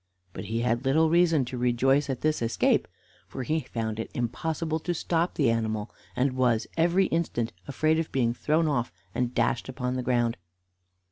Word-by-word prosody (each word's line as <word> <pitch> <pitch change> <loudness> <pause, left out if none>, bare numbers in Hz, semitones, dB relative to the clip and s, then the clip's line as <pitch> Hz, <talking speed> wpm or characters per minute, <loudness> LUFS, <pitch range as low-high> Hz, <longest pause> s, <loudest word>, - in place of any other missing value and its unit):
But - - -6
he 115 +3 -2
had 120 +1 0
little 155 +4 +3
reason 165 -5 +4
to 125 0 -5
rejoice 135 +4 +2
at 130 -2 -3
this 155 -3 +1
escape, 115 0 +2 0.4
for 130 - -5
he 155 +5 0
found 115 -5 -4
it 115 - -4
impossible 160 +6 -2
to 175 +2 -2
stop 170 +1 0
the 135 -6 +3
animal, 110 -1 -2 0.2
and 130 0 +1
was 125 -3 +2
every 175 +3 +3
instant 155 -9 -1
afraid 155 +3 +1
of 165 - -3
being 120 -3 +1
thrown 155 +6 +1
off 125 -6 0 0.2
and 125 0 -1
dashed 120 - 0
upon 125 -1 -3
the 130 - -1
ground. 120 -2 +1
130 Hz, 180 wpm, -27 LUFS, 120-160 Hz, 0.4 s, reason